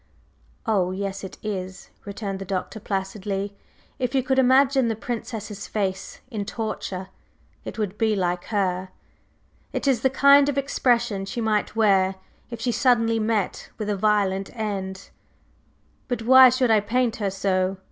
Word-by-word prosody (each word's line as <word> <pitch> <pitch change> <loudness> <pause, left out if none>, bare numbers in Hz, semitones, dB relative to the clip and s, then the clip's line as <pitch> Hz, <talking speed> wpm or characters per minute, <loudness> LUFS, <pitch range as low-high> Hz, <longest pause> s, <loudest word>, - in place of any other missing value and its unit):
"Oh, 200 -6 +1
yes 195 +1 -4
it 190 - -8
is!" 190 -3 -5
returned 200 -1 -5
the - - -5
Doctor 190 +3 -4
placidly. 195 0 -3 0.4
"If 250 0 -1
you 260 - +2
could 265 +1 +1
imagine 265 0 +4
the 225 - 0
Princess's 220 -3 -5
face 195 -2 -3
in 215 -3 -3
torture, 195 -3 -5 0.6
it - - -7
would 210 -2 -3
be 220 -2 +2
like 180 -2 -1
her. 190 -3 -1 0.8
It - - -3
is 255 -5 +2
the 265 - +3
kind 280 +1 +6
of 280 - -2
expression 240 -7 +1
she 215 - -4
might 215 -1 0
wear 195 -4 +3 0.3
if 235 -2 -7
she 245 +2 0
suddenly 230 -2 +2
met 215 -3 -1
with 210 -1 -2
a - - 0
violent 195 -1 +1
end." 195 -3 -4 1.0
"But 245 -2 -3
why 260 +2 +9
should 250 -1 +2
I 220 - +6
paint 230 +3 0
her 205 -3 -1
so?" 190 -1 0
210 Hz, 155 wpm, -24 LUFS, 195-240 Hz, 1.0 s, why